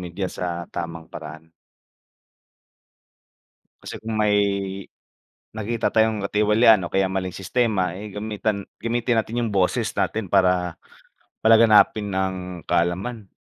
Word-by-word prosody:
media 90 Hz, +1 st, -5 dB
sa 85 Hz, -1 st, -4 dB
tamang 85 Hz, 0 st, -6 dB
paraan. 80 Hz, -1 st, -10 dB, 2.3 s
Kasi -, -, -8 dB
kung 110 Hz, -1 st, -3 dB
may 105 Hz, -1 st, +3 dB, 1.2 s
nakita 115 Hz, +2 st, -1 dB
tayong 110 Hz, -1 st, +2 dB
katiwalian 105 Hz, -1 st, +4 dB
o -, -, -7 dB
kaya 95 Hz, -1 st, +1 dB
maling 95 Hz, -1 st, -3 dB
sistema, 95 Hz, -4 st, 0 dB
eh, 105 Hz, +1 st, -8 dB
gamitan 105 Hz, -1 st, -3 dB
gamitin 120 Hz, 0 st, 0 dB
natin 110 Hz, +1 st, -2 dB
'yung 115 Hz, -2 st, -2 dB
boses 95 Hz, -2 st, +1 dB
natin 110 Hz, -4 st, -1 dB
para 90 Hz, -3 st, +2 dB, 0.6 s
palaganapin 110 Hz, -2 st, +5 dB
ang 95 Hz, 0 st, -1 dB, 0.3 s
kaalaman, 95 Hz, +6 st, -1 dB
100 Hz, 110 wpm, -23 LUFS, 90-110 Hz, 2.3 s, palaganapin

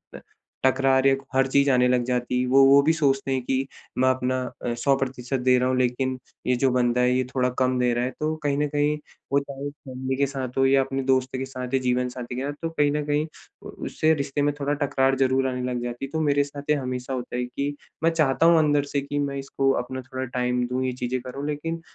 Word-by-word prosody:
अ, -, -, -7 dB, 0.5 s
तकरार 130 Hz, 0 st, +3 dB
या 135 Hz, -, +5 dB
को 135 Hz, 0 st, -12 dB
हर 135 Hz, 0 st, +4 dB
चीज़ 140 Hz, +1 st, +3 dB
आने 125 Hz, 0 st, +4 dB
लग 125 Hz, -1 st, +2 dB
जाती 125 Hz, 0 st, -1 dB
है 125 Hz, -, +1 dB
वो 135 Hz, +2 st, +6 dB
वो 140 Hz, +1 st, +7 dB
भी 160 Hz, -, +4 dB
सोचते 135 Hz, -3 st, +1 dB
हैं 130 Hz, -1 st, 0 dB
कि 135 Hz, +1 st, -1 dB, 0.3 s
मैं 130 Hz, +1 st, +4 dB
अपना 130 Hz, 0 st, 0 dB, 0.2 s
अ, 120 Hz, -, 0 dB
100% 130 Hz, 0 st, -1 dB
दे 125 Hz, 0 st, +4 dB
रहा 125 Hz, +1 st, +1 dB
हूँ 130 Hz, -, +1 dB
लेकिन, 130 Hz, +1 st, 0 dB, 0.3 s
ये 125 Hz, -, +3 dB
जो 130 Hz, +2 st, +2 dB
बंदा 125 Hz, -1 st, +2 dB
है 125 Hz, 0 st, +3 dB
ये 130 Hz, -, +2 dB
थोड़ा 125 Hz, -1 st, +2 dB
कम 130 Hz, 0 st, +2 dB
दे 125 Hz, -1 st, +2 dB
रहा 120 Hz, +1 st, 0 dB
है 130 Hz, -, -2 dB
तो 155 Hz, +1 st, -1 dB
कहीं 140 Hz, -1 st, +1 dB
न 150 Hz, +1 st, +1 dB
कहीं 145 Hz, 0 st, +1 dB, 0.4 s
वो 140 Hz, -, +5 dB
चाहे 140 Hz, 0 st, -6 dB
फ़ैमिली 130 Hz, -2 st, -5 dB
के 140 Hz, -, +3 dB
साथ 130 Hz, -2 st, -5 dB
हो 135 Hz, -, +4 dB
या 135 Hz, 0 st, +5 dB
अपने 135 Hz, 0 st, -3 dB
दोस्त 130 Hz, 0 st, +1 dB
के 130 Hz, -, -3 dB
साथ 130 Hz, -1 st, -7 dB
या 135 Hz, -, +3 dB
जीवन-साथी 125 Hz, -1 st, -2 dB
के 130 Hz, -, -3 dB
साथ, 145 Hz, +1 st, -3 dB
तो 165 Hz, -, -2 dB
कहीं 145 Hz, -3 st, +1 dB
न 150 Hz, 0 st, -1 dB
कहीं 150 Hz, +1 st, +1 dB
अ, 160 Hz, -, -16 dB
उससे 160 Hz, 0 st, 0 dB
रिश्ते 140 Hz, 0 st, -2 dB
में 145 Hz, 0 st, +2 dB
थोड़ा 140 Hz, +1 st, 0 dB
तकरार 135 Hz, 0 st, +2 dB
ज़रूर 130 Hz, 0 st, +2 dB
आने 125 Hz, 0 st, -3 dB
लग 120 Hz, -1 st, -2 dB
जाती 120 Hz, +2 st, -4 dB
है -, -, -10 dB
तो 160 Hz, -, -1 dB
मेरे 145 Hz, -2 st, +3 dB
साथ 145 Hz, +1 st, -9 dB
ये -, -, +5 dB
हमेशा 130 Hz, -1 st, -4 dB
होता 125 Hz, -1 st, -4 dB
है 125 Hz, -, -1 dB
कि 140 Hz, +4 st, -3 dB, 0.3 s
मैं 165 Hz, -, +4 dB
चाहता 155 Hz, -2 st, +2 dB
हूँ 165 Hz, -1 st, +6 dB
अंदर 145 Hz, -2 st, +3 dB
से 140 Hz, -, +1 dB
कि 145 Hz, +1 st, -3 dB
मैं 140 Hz, -1 st, -2 dB
इसको 135 Hz, 0 st, 0 dB
अपना 130 Hz, +1 st, -6 dB
थोड़ा 130 Hz, 0 st, -5 dB
टाइम 125 Hz, 0 st, +1 dB
दूँ 125 Hz, +1 st, -2 dB
ये 130 Hz, -, 0 dB
चीज़ें 125 Hz, +1 st, -1 dB
करूँ 130 Hz, +3 st, -6 dB
लेकिन, 165 Hz, +3 st, -3 dB
135 Hz, 250 wpm, -25 LUFS, 125-140 Hz, 0.5 s, वो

